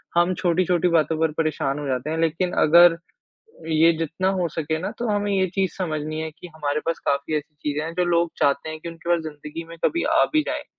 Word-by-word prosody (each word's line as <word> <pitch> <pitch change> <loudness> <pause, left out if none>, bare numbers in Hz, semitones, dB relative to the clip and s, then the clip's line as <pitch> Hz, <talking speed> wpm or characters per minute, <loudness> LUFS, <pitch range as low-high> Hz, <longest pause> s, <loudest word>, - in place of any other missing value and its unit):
हम 175 +2 +3
छोटी-छोटी 180 -1 +2
बातों 160 0 +2
पर 160 -1 +2
परेशान 150 -3 -1
हो 145 - -4
जाते 130 +3 -2
हैं, 160 - -2
लेकिन 165 +3 0
अगर 170 +2 +7 0.7
ये 160 +1 +5
जितना 165 +4 -1
हो 175 - +1
सके 160 0 -2
ना - - -3
तो 240 - -1
हमें 205 0 0
ये 190 -1 +2
चीज़ 190 -3 +1
समझनी 155 -4 -3
है 160 0 -4
कि 170 +3 -12
हमारे 150 -1 -1
पास 165 0 -1
काफ़ी 140 +2 0
ऐसी 150 +1 -8
चीज़ें 150 0 -3
हैं, 165 +1 -5
जो 180 +1 0
लोग 170 -1 +1
चाहते 140 +2 +1
हैं 155 0 -6
कि 170 - -7
उनके 165 +1 -9
पास 170 -1 +3
ज़िंदगी 150 +1 -7
में 165 - -10
कभी 335 - +1 0.2
आ - - +6
भी 310 - +4
जाएँ। - - -3
165 Hz, 230 wpm, -23 LUFS, 155-175 Hz, 0.7 s, अगर